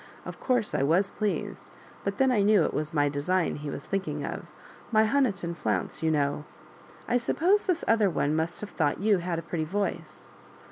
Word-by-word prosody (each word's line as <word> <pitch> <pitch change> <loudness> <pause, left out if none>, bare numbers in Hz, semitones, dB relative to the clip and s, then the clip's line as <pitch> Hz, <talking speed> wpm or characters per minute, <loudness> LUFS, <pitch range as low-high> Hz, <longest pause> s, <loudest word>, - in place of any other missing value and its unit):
*' - - -22
Of - - -8
course 245 -5 0
I - - +1
was 175 +8 +2
pleased; 210 -1 -3 0.3
but 200 0 -2
then 265 -1 +3
I 220 -5 +3
knew 205 -3 +5
it - - -2
was 155 +1 -2
my 145 -3 +2
design 165 +6 0
he 150 0 -6
was 140 - -6
thinking 195 0 -2
of - - -6 0.2
— - - -21
my 220 -1 +5
Honiton 215 -9 +1
flounce, 105 - -2
you 160 - +2
know. 145 -1 0 0.6
I 245 - +3
suppose 360 +12 +2
this 350 -2 +1
other 220 -3 +4
one 150 -3 0
must 160 +2 -2
have 210 - -6
thought 145 -3 0
you 205 -1 +3
had 170 -1 -2
a 165 - -4
pretty 165 -1 -3
voice." 200 +5 -4
185 Hz, 205 wpm, -27 LUFS, 155-215 Hz, 0.6 s, knew